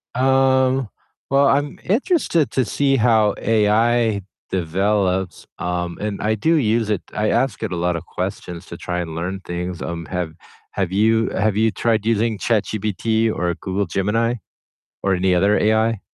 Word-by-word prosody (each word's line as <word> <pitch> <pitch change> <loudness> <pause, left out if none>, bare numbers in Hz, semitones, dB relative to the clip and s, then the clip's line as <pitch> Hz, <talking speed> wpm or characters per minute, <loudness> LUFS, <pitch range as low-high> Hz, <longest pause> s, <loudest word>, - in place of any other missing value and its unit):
Um, 130 -1 +3 0.4
well, 140 +1 +4
I'm 145 +1 +1
interested 215 - +1
to 130 - +1
see 135 +3 +1
how 110 -3 +3
AI 110 0 +2 0.3
develops, 95 +1 0
um, 90 0 -3
and 105 -1 -3
I 110 +1 +1
do 160 +10 +2
use 115 -5 +1
it, 105 -4 0
I 105 0 0
ask 135 - 0
it 110 -4 -3
a - - -2
lot 90 0 0
of 85 +1 -5
questions 90 -1 -5
to 85 - -8
try 90 0 -3
and 80 -2 -4
learn 95 +4 -4
things, 90 0 -4
um, 85 -1 -4
have 90 -3 -3 0.4
have 95 -2 -2
you 110 +3 +2
have 105 -1 0
you 110 0 +3
tried 110 -1 0
using 115 -1 +1
ChatGPT 110 +1 0
or 85 0 0
Google 95 +2 -2
Gemini 105 +7 0 0.7
or 95 -1 +2
any 90 0 +2
other 100 +4 +3
AI? 110 0 +2
105 Hz, 160 wpm, -21 LUFS, 90-115 Hz, 0.7 s, well